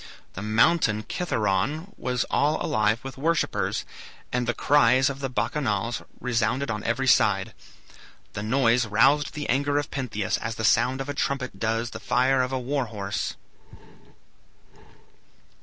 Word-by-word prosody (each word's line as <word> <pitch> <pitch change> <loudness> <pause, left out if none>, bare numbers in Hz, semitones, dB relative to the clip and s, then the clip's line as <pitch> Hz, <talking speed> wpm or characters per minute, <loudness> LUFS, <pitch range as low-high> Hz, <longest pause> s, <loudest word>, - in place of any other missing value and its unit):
The 95 - -6
mountain 110 +1 +2
Citheron 145 - -1
was 125 -1 -1
all 150 +2 +2
alive 110 +1 +1
with 135 0 -8
worshippers, 165 +3 0 0.5
and 125 -1 0
the 120 - +1
cries 135 -1 +4
of 135 - -9
the 135 -1 -3
Bacchanals 120 -4 -1 0.2
resounded 120 +2 0
on 105 -2 -4
every - - -1
side. - - +3 0.8
The 105 - -4
noise 120 +1 +2
roused 135 +8 +3
the 150 - -4
anger 145 +3 +1
of 145 0 -2
Pentheus 110 -8 -2
as 115 0 -4
the 110 - -2
sound 125 +5 +3
of 135 - -5
a - - -2
trumpet 140 -2 -2
does 115 +1 -1
the - - -7
fire 130 +1 +2
of 125 +1 -2
a 130 - -1
war 130 +1 -1
horse. 100 -3 -4
125 Hz, 145 wpm, -25 LUFS, 110-140 Hz, 0.8 s, cries